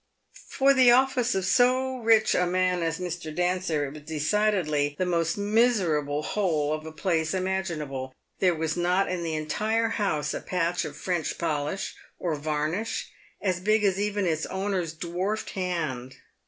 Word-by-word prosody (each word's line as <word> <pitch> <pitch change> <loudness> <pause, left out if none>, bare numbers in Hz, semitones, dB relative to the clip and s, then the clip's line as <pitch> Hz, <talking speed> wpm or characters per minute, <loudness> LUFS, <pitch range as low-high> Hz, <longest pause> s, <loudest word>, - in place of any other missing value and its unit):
For 275 +1 +4
the 260 -2 +6
office 250 -1 +3
of 190 -1 0
so 255 +4 +3
rich 225 -1 +4
a 180 - +2
man 180 0 +1
as 165 0 -1
Mr. 175 -3 -5
Dancer, 180 -4 0
it 140 - -7
was 150 - -10
decidedly 155 -2 0
the 185 - 0
most 170 -1 0
miserable 195 -10 +2
hole 155 -8 0
of 155 0 -5
a - - -6
place 160 0 0
imaginable. 165 -9 -2 0.3
There 180 -3 +3
was 160 -1 -1
not 180 +2 +1
in 180 -1 -2
the 165 -2 -2
entire 215 +9 0
house 155 -10 -1
a - - -4
patch 175 -1 -1
of 150 -1 -7
French 175 -1 -2
polish, 150 +2 -2 0.2
or 170 -3 -2
varnish, 155 +8 -2 0.3
as 185 -3 0
big 215 +3 +2
as 195 -1 +2
even 205 -1 0
its 160 -2 0
owner's 190 -4 -2
dwarfed 180 +6 -3
hand. 155 -9 -3
180 Hz, 160 wpm, -27 LUFS, 155-205 Hz, 0.3 s, the